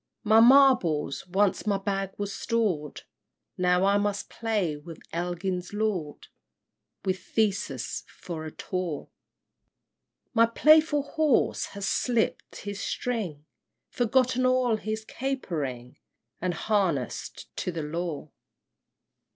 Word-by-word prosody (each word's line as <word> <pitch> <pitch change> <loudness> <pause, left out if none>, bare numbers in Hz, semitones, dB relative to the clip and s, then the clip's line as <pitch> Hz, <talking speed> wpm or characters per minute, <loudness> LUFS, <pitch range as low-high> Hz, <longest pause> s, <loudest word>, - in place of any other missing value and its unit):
III. - - -4
My 220 - +8
marbles 225 - +5
once 195 +3 +1
my 200 -1 +2
bag 195 -1 -2
was 205 -1 -3
stored, 195 - -1 0.5
Now 180 +1 +3
I 200 +1 +4
must 205 -1 -2
play 210 -9 -1
with 155 +2 -10
Elgin's 180 +2 -3
lord, 205 -8 -2 0.8
With 185 -1 0
Theseus 190 - -1
for 165 -3 -7
a 155 - -6
taw! 180 -5 -4 1.2
My 230 -1 +5
playful 305 +4 +5
horse 300 -2 +1
has 200 - -3
slipt 240 -3 0
his 205 0 -5
string, 190 -12 -3 0.4
Forgotten 255 +1 +2
all 255 -3 +3
his 215 +1 -4
capering, 150 - -4 0.4
And 180 -1 -1
harness'd 175 - -1
to 180 - -2
the 165 -2 -4
law! 155 -1 -4
195 Hz, 110 wpm, -27 LUFS, 170-230 Hz, 1.2 s, My